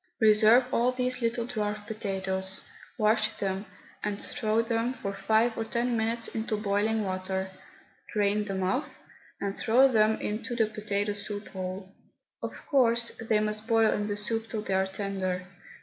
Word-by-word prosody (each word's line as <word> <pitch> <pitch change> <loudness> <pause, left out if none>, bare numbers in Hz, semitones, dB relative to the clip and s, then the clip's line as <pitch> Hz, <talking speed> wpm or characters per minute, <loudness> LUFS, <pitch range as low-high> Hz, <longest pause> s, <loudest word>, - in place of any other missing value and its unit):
Reserve 225 +4 +6
all 245 +2 +3
these 255 0 -2
little 235 0 0
dwarf 210 -3 -3
potatoes, 190 -3 -3 0.4
wash 215 0 +2
them, 195 +1 -3 0.4
and 205 -1 -2
throw 220 +1 0
them 230 +2 0
for 195 -5 -4
five 220 +4 +2
or 225 - -1
ten 235 +2 0
minutes 230 +1 0
into 220 -1 -2
boiling 210 +1 +1
water, 190 0 -2 0.6
drain 210 0 +1
them 195 -2 -2
off 225 +11 0 0.5
and 200 0 -2
throw 250 +4 +5
them 220 -1 +3
into 220 +3 -3
the 225 -2 +3
potato 210 -1 -2
soup 205 0 -6
whole. 190 +1 -6 0.5
Of - - -4
course 235 -4 +3
they 220 -1 +2
must 215 +1 -2
boil 225 -2 +4
in 205 0 -1
the 205 -1 -2
soup 225 +2 -1
till 215 -2 -3
they 195 - -2
are 190 0 +2
tender. 190 -2 -2
215 Hz, 160 wpm, -29 LUFS, 200-230 Hz, 0.6 s, Reserve